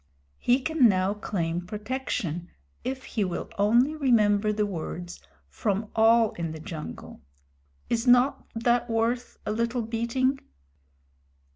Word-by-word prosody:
He 245 Hz, +2 st, +3 dB
can 285 Hz, -4 st, +4 dB
now 190 Hz, 0 st, +1 dB
claim 175 Hz, -5 st, -2 dB
protection, 205 Hz, -, -3 dB, 0.3 s
if 265 Hz, 0 st, -4 dB
he 215 Hz, -, -2 dB
will 185 Hz, +2 st, -4 dB
only 240 Hz, +9 st, +4 dB
remember 215 Hz, -7 st, +3 dB
the 210 Hz, 0 st, 0 dB
words, 175 Hz, -1 st, -6 dB, 0.3 s
from 210 Hz, 0 st, -2 dB
all 225 Hz, 0 st, +5 dB
in 165 Hz, -2 st, -4 dB
the 160 Hz, -, -8 dB
jungle. 160 Hz, -2 st, -8 dB, 0.7 s
Is 235 Hz, +2 st, -1 dB
not 250 Hz, +3 st, +4 dB
that 240 Hz, +1 st, +1 dB
worth 230 Hz, +2 st, -1 dB
a -, -, -1 dB
little 235 Hz, +2 st, -1 dB
beating?" 235 Hz, +4 st, 0 dB
225 Hz, 125 wpm, -27 LUFS, 200-245 Hz, 0.7 s, all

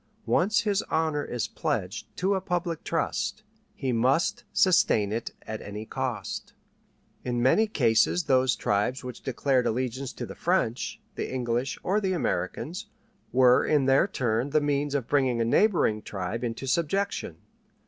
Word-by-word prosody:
Once 210 Hz, +5 st, +2 dB
his 205 Hz, -3 st, +1 dB
honor 160 Hz, -2 st, 0 dB
is 120 Hz, -3 st, -3 dB
pledged -, -, -3 dB
to 190 Hz, +2 st, +1 dB
a 190 Hz, -, 0 dB
public 175 Hz, -3 st, -2 dB
trust, 170 Hz, +5 st, -2 dB, 0.3 s
he 130 Hz, -2 st, -2 dB
must 130 Hz, +7 st, +1 dB
sustain 110 Hz, -, +3 dB
it 115 Hz, +2 st, -2 dB
at 110 Hz, 0 st, -6 dB
any 105 Hz, +2 st, -7 dB
cost. 130 Hz, 0 st, -4 dB, 0.7 s
In 120 Hz, -1 st, -1 dB
many 130 Hz, -, +4 dB
cases 120 Hz, -, +2 dB
those 130 Hz, -2 st, +3 dB
tribes 105 Hz, +7 st, 0 dB
which 125 Hz, -2 st, -7 dB
declared 130 Hz, 0 st, +1 dB
allegiance 130 Hz, +3 st, -2 dB
to -, -, -5 dB
the -, -, -8 dB
French, 170 Hz, -10 st, -1 dB
the -, -, -4 dB
English, 125 Hz, 0 st, -1 dB
or 205 Hz, +3 st, +1 dB
the 190 Hz, -2 st, 0 dB
Americans, 150 Hz, -, -2 dB, 0.4 s
were 125 Hz, 0 st, +5 dB
in 150 Hz, -3 st, +2 dB
their 135 Hz, 0 st, +4 dB
turn 120 Hz, +1 st, -1 dB
the 155 Hz, +2 st, +3 dB
means 145 Hz, -1 st, 0 dB
of 135 Hz, -5 st, -1 dB
bringing 130 Hz, -4 st, +2 dB
a 115 Hz, -, +2 dB
neighboring 120 Hz, -, +3 dB
tribe 100 Hz, +3 st, -4 dB
into 120 Hz, +2 st, -3 dB
subjection. 170 Hz, +8 st, -1 dB
130 Hz, 150 wpm, -27 LUFS, 120-165 Hz, 0.7 s, were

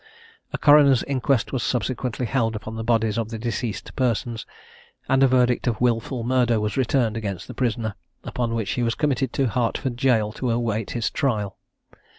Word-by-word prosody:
A -, -, -2 dB
coroner's 145 Hz, -4 st, +6 dB
inquest 135 Hz, -2 st, 0 dB
was 130 Hz, -, 0 dB
subsequently 125 Hz, 0 st, -2 dB
held 115 Hz, -2 st, 0 dB
upon 110 Hz, +1 st, -6 dB
the 110 Hz, -, -4 dB
bodies 115 Hz, -1 st, +1 dB
of 110 Hz, -1 st, -3 dB
the 115 Hz, -, -5 dB
deceased 115 Hz, -1 st, -4 dB
persons, 120 Hz, -2 st, -1 dB, 0.6 s
and 135 Hz, 0 st, +3 dB
a 135 Hz, -, +7 dB
verdict 125 Hz, -1 st, +2 dB
of 115 Hz, -3 st, 0 dB
"Wilful 120 Hz, 0 st, 0 dB
Murder" 120 Hz, -2 st, +2 dB
was 105 Hz, 0 st, -2 dB
returned 125 Hz, -3 st, +1 dB
against 100 Hz, -5 st, -4 dB
the -, -, -7 dB
prisoner, 115 Hz, -3 st, -1 dB, 0.3 s
upon 120 Hz, -3 st, -2 dB
which 110 Hz, -3 st, -2 dB
he 125 Hz, -, -1 dB
was 115 Hz, -1 st, 0 dB
committed 140 Hz, -4 st, 0 dB
to 135 Hz, -3 st, +1 dB
Hertford 120 Hz, +2 st, -1 dB
Jail 120 Hz, -5 st, +2 dB
to 125 Hz, +2 st, -3 dB
await 115 Hz, -2 st, -1 dB
his 120 Hz, -2 st, -2 dB
trial. 105 Hz, -8 st, -1 dB
120 Hz, 175 wpm, -23 LUFS, 110-130 Hz, 0.6 s, a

